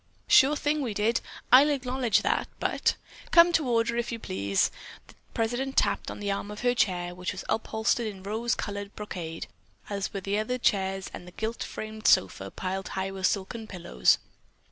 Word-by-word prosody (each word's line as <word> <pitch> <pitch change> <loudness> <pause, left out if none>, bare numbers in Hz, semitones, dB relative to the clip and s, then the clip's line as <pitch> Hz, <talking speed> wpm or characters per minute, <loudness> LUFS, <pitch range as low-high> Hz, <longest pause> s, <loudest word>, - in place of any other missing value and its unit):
"Sure 275 +3 +6
thing 295 +1 0
we 235 -6 -3
did, 215 +3 +1 0.3
I'll 270 +4 +8
acknowledge 255 -5 +1
that, - - +1
but——" - - +1 0.3
"Come 340 0 +7
to 310 -5 +2
order, 235 0 +1
if 240 0 -1
you 230 - -3
please!" 100 - 0 0.3
the - - -17 0.2
president 245 +4 -1
tapped - - +2
on - - -7
the 205 -1 -1
arm 200 +1 -3
of 210 +1 -7
her 245 0 +3
chair, 180 -7 0
which 180 +1 -3
was 185 - -7
upholstered 220 +1 0
in 195 -3 -7
rose 225 +4 -1
colored 205 0 -5
brocade 170 -6 -5 0.5
as 200 -1 -2
were 195 - -4
the 200 +2 -1
other 250 +4 -1
chairs 195 -4 0
and 175 - -9
the - - -10
gilt 220 +5 -4
framed 215 0 -4
sofa 95 +1 +3
piled 190 - -4
high 190 0 -1
with 190 -1 +1
silken 215 +3 -3
pillows. 170 - +2
210 Hz, 185 wpm, -28 LUFS, 190-240 Hz, 0.5 s, I'll